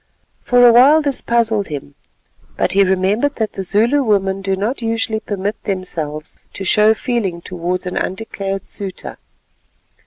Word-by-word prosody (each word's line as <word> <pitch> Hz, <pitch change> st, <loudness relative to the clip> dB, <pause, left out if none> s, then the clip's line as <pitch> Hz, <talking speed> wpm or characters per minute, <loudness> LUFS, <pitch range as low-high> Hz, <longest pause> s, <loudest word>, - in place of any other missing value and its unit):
For 245 Hz, 0 st, +5 dB
a 235 Hz, -, +6 dB
while 285 Hz, +6 st, +6 dB
this 280 Hz, -2 st, 0 dB
puzzled 225 Hz, -3 st, 0 dB
him, 145 Hz, -2 st, -7 dB, 0.6 s
but -, -, +1 dB
he 200 Hz, +1 st, +5 dB
remembered 195 Hz, +9 st, +1 dB
that 220 Hz, -2 st, -2 dB
the -, -, -5 dB
Zulu 220 Hz, +9 st, +2 dB
women 195 Hz, -5 st, 0 dB
do 195 Hz, 0 st, -1 dB
not 220 Hz, +7 st, -3 dB
usually 225 Hz, -1 st, -1 dB
permit 205 Hz, 0 st, -4 dB
themselves 165 Hz, -6 st, -4 dB, 0.2 s
to 195 Hz, -, -6 dB
show 215 Hz, +3 st, +4 dB
feeling 215 Hz, -9 st, -2 dB
towards 180 Hz, +1 st, -4 dB
an 180 Hz, -, -4 dB
undeclared 195 Hz, -1 st, -4 dB
suitor. 195 Hz, -2 st, -5 dB
205 Hz, 150 wpm, -18 LUFS, 190-230 Hz, 0.6 s, a